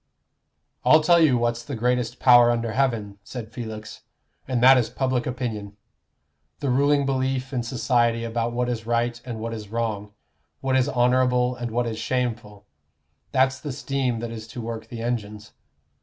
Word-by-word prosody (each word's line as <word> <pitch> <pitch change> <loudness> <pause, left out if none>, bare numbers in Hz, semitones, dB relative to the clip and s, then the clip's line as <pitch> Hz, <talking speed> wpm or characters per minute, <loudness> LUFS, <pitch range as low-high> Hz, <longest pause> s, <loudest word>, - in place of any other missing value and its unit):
"I'll 155 - +6
tell 170 +2 +5
you 150 -6 +4
what's 120 0 0
the 135 +3 -5
greatest 125 +1 0
power 120 -2 +7
under 115 -1 0
heaven," 110 -5 -1
said 115 0 -8
Felix, 110 -2 -7 0.5
"and 130 -2 0
that 130 +1 +9
is 125 -3 +1
public 130 -2 -1
opinion 110 -5 -4 0.8
the 140 -3 -1
ruling 140 +2 +3
belief 130 -1 -1
in 125 - 0
society 120 -1 +1
about 115 0 -2
what 120 +1 -1
is 115 -2 -4
right 120 0 0
and 120 -3 -6
what 115 +1 -4
is 105 -2 -7
wrong, 105 -2 -3 0.5
what 135 -1 0
is 130 +1 +2
honorable 125 -1 +2
and 120 -1 -4
what 120 +2 0
is 110 -1 -4
shameful. 115 -4 -3 0.7
That's 130 0 +2
the 145 +1 -5
steam 130 -3 -2
that 115 -1 -4
is 110 -1 -8
to 120 +2 -7
work 115 -1 -6
the 115 -1 -7
engines. 105 -3 -4
120 Hz, 170 wpm, -24 LUFS, 115-130 Hz, 0.8 s, that